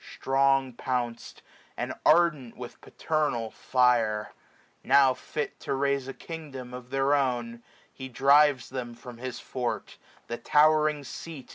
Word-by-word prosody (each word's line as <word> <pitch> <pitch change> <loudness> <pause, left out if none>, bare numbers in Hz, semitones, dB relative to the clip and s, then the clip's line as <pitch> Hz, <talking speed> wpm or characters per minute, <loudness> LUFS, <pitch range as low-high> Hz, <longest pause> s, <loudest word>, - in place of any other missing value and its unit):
Strong 135 -1 +2
pounc'd, 120 -1 -4 0.3
and - - -3
ardent 150 -7 +3
with 125 -1 -9
paternal 145 -8 -2
fire; 115 -4 +1 0.5
Now 135 -2 +5
fit 150 +3 -5
to - - -3
raise 140 -1 0
a 135 - -5
kingdom 140 -7 -8
of 125 0 -9
thdr 135 +2 +2
own, 120 -4 -1 0.3
He 130 -1 -8
drives 140 +1 +4
them 125 -2 -6
from 120 0 -11
his 125 -1 -5
fort, 125 -2 -4 0.3
the 120 - -5
towering 155 0 +3
seat. 145 +1 -9
130 Hz, 130 wpm, -27 LUFS, 120-145 Hz, 0.5 s, Now